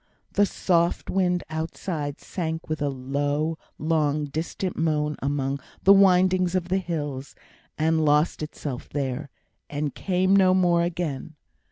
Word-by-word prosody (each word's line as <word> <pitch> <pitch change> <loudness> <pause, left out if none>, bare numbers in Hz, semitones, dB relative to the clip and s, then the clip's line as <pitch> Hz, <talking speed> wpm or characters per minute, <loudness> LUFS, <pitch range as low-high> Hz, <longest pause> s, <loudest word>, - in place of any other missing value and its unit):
The 205 0 +3
soft 170 -3 +1
wind 180 -2 +1
outside 160 -2 -4
sank 160 -3 -4
with 155 -1 -3
a 145 - +1
low, 145 +4 -1 0.2
long, 150 -2 +1
distant 165 +5 -3
moan 150 -2 0
among 140 0 -1 0.2
the 195 - +8
windings 185 -2 +4
of 180 -1 -1
the 190 +1 +2
hills, 145 -6 -4 0.4
and 160 0 +2
lost 150 +2 +2
itself 145 -4 -5
there, 140 0 -3 0.4
and 145 -1 -2
came 185 0 +2
no 185 -1 +5
more 175 -2 +3
again. 165 -3 -3
160 Hz, 135 wpm, -25 LUFS, 145-180 Hz, 0.4 s, the